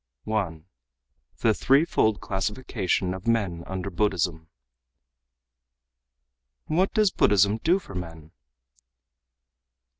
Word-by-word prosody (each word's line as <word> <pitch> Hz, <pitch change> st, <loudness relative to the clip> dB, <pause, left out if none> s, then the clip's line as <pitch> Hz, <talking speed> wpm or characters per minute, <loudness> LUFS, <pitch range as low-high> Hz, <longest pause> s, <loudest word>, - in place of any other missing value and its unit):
1. 95 Hz, -8 st, -3 dB, 0.8 s
The 110 Hz, -, +4 dB
Threefold 135 Hz, -5 st, +2 dB
Classification 95 Hz, -2 st, -2 dB
of 95 Hz, +4 st, -8 dB
Men 100 Hz, -8 st, 0 dB
Under 95 Hz, +1 st, -4 dB
Buddhism 85 Hz, -4 st, -1 dB, 2.2 s
"What 180 Hz, +5 st, +1 dB
does 215 Hz, -3 st, +4 dB
Buddhism 100 Hz, +2 st, +3 dB
do 170 Hz, +9 st, +3 dB
for 170 Hz, -, -11 dB
men?" 80 Hz, -3 st, -8 dB
100 Hz, 85 wpm, -25 LUFS, 90-115 Hz, 2.2 s, The